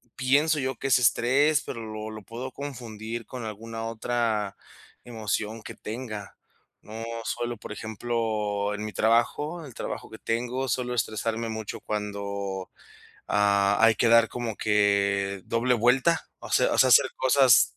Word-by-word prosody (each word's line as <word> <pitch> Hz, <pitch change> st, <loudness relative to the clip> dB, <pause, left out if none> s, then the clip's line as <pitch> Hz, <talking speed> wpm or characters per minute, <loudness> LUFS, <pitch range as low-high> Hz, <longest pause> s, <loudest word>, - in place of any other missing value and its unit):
pienso 145 Hz, +4 st, +3 dB
yo 130 Hz, -1 st, -1 dB
que 135 Hz, -, -3 dB
es 130 Hz, -1 st, +5 dB
estrés, 135 Hz, +4 st, +3 dB
pero 115 Hz, -, -5 dB
lo 110 Hz, -1 st, -6 dB
lo 110 Hz, 0 st, -8 dB
puedo 120 Hz, +5 st, -6 dB
confundir 120 Hz, -5 st, -6 dB
con 125 Hz, -3 st, -7 dB
alguna 115 Hz, +1 st, -6 dB
otra 115 Hz, -3 st, -1 dB, 0.5 s
emoción 110 Hz, -1 st, -3 dB
que -, -, -8 dB
tenga. 110 Hz, -3 st, -6 dB, 0.5 s
No 110 Hz, +2 st, -8 dB, 0.2 s
suelo, 120 Hz, +1 st, -2 dB
por 105 Hz, -, -9 dB
ejemplo, 110 Hz, -2 st, -2 dB
en 105 Hz, +1 st, -4 dB
mi 105 Hz, -, -6 dB
trabajo 145 Hz, +9 st, +1 dB
el 135 Hz, -, -11 dB
trabajo -, -, -5 dB
que 110 Hz, -, -11 dB
tengo, 125 Hz, +3 st, -2 dB
suelo 125 Hz, +1 st, -1 dB
estresarme 115 Hz, 0 st, -1 dB
mucho 110 Hz, -1 st, -5 dB
cuando, 100 Hz, -2 st, -4 dB, 0.6 s
ah, 100 Hz, 0 st, +3 dB
hay 115 Hz, 0 st, +6 dB
que 120 Hz, -, +3 dB
dar 115 Hz, 0 st, +6 dB
como 120 Hz, -3 st, -4 dB
que 100 Hz, -2 st, +1 dB
doble 120 Hz, +2 st, +2 dB
vuelta. 130 Hz, +8 st, +3 dB
O -, -, -9 dB
sea -, -, +3 dB
o -, -, 0 dB
sea, -, -, +6 dB
hacer -, -, +7 dB
cosas. -, -, +5 dB
115 Hz, 150 wpm, -27 LUFS, 105-125 Hz, 0.6 s, hacer